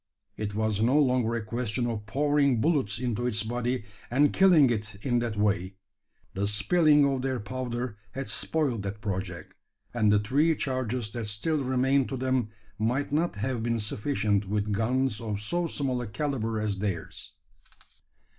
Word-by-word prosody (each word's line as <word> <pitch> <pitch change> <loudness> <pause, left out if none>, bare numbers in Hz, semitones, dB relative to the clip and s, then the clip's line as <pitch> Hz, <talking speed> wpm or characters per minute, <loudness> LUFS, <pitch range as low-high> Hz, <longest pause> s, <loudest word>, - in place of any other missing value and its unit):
It 105 -1 -4
was 110 -1 0
no 125 +6 +4
longer 125 -5 +2
a 115 -2 -3
question 120 +1 -2
of 110 -3 -3
pouring 140 +1 +2
bullets 135 -8 +1
into 120 0 -1
its 110 -3 0
body, 120 +1 -2 0.2
and 145 +4 +3
killing 170 -9 +6
it 110 -2 -3
in 120 -3 +2
that 115 -3 -3
way. 100 -2 0 0.6
The 100 +1 -1
spilling 150 - +4
of 135 -2 0
their 130 -1 -1
powder 120 0 -4 0.2
had 135 +1 -4
spoiled 125 +2 +1
that 100 +1 -5
project; 95 -4 -4 0.4
and 110 -3 +3
the 105 - +5
three 140 +10 +2
charges 130 -5 -2
that 115 -1 -4
still 140 +8 -1
remained 130 +1 +2
to 135 - -3
them 130 -3 0 0.3
might 125 +7 0
not 160 -2 +1
have 115 +3 -2
been 115 0 0
sufficient 105 -1 0
with 105 0 -1
guns 115 +2 0
of 105 -3 -3
so 170 +12 -1
small 135 -5 -1
a 120 - -5
calibre 115 -3 -2
as 100 -2 -2
theirs. 95 -5 -4
120 Hz, 165 wpm, -28 LUFS, 105-135 Hz, 0.6 s, killing